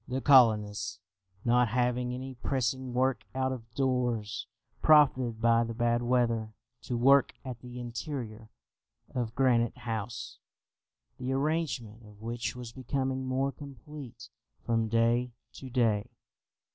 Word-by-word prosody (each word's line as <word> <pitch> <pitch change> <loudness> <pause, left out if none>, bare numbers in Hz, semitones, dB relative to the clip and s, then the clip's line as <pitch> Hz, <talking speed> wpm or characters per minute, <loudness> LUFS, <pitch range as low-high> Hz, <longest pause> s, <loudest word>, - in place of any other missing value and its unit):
The 130 +1 -2
colonists, 110 -7 +4 0.5
not 120 +1 +4
having 125 +1 0
any 130 +1 -5
pressing 130 0 -2
work 125 -3 +1
out 130 0 0
of 115 -3 -7
doors, 120 -5 -1 0.3
profited 130 -7 +5
by 115 0 +4
the 115 -1 -5
bad 120 +1 +1
weather 115 -3 +1 0.3
to 120 - -2
work 135 +3 +5
at 125 -2 -6
the 125 +1 -9
interior 120 -3 -6 0.6
of 120 -2 -2
Granite 125 -3 +2
House, 115 -2 -5 0.8
the 125 +1 -2
arrangement 135 -6 -1
of 105 -1 -16
which 115 +2 -4
was 125 -2 -7
becoming 130 +1 -2
more 135 +2 0
complete 140 -1 -10 0.3
from 115 -1 +1
day 115 +2 +2 0.2
to 130 - -9
day. 115 -5 +1
125 Hz, 125 wpm, -30 LUFS, 115-130 Hz, 0.8 s, profited